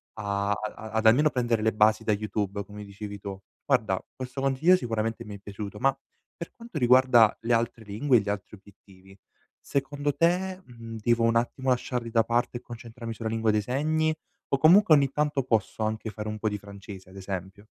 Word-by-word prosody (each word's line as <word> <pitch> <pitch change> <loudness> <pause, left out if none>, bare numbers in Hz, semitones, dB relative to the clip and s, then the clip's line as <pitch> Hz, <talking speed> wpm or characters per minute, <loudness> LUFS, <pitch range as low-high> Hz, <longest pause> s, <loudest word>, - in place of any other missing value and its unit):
a 100 -1 -2
a 105 +1 -4
ad 110 +1 -1
almeno 140 +8 +6
prendere 120 -4 0
le 110 0 +2
basi 110 +1 +3
da 110 - +1
YouTube, 100 -1 -2
come 105 0 -9
dicevi 100 0 -8
tu. 100 -1 -7 0.3
Guarda, 95 -4 +1
questo 130 +1 -6
consiglio 135 +7 +4
sicuramente 115 -8 -2
mi 105 0 -8
è - - -11
piaciuto, 100 0 -7
ma, 135 +1 +2 0.4
per 170 - -8
quanto 230 -7 -9
riguarda 125 -3 +5
le 115 +1 0
altre 115 -1 -1
lingue 120 +5 +2
e - - +4
gli 100 - -5
altri 105 +1 -5
obiettivi, 95 -1 -19 0.4
secondo 145 +1 -2
te, 180 +5 +1
mhmm, 115 -2 -9
devo 115 +1 +2
un 115 0 +3
attimo 130 +2 -1
lasciarli 125 -1 -1
da 115 -1 +3
parte 120 +1 0
e - - -10
concentrarmi 115 -1 -8
sulla 110 0 -4
lingua 110 0 +1
dei 105 0 +1
segni 155 +7 0 0.4
o 140 - +5
comunque 170 +3 +7
ogni 140 -2 +4
tanto 150 -2 0
posso 110 -3 -1
anche 110 +1 -2
fare 105 0 -6
un 110 0 -4
po' 110 - -2
di 105 - -3
francese, 100 -2 -11
ad 95 - -15
esempio? 95 +1 -6
115 Hz, 195 wpm, -27 LUFS, 105-130 Hz, 0.4 s, comunque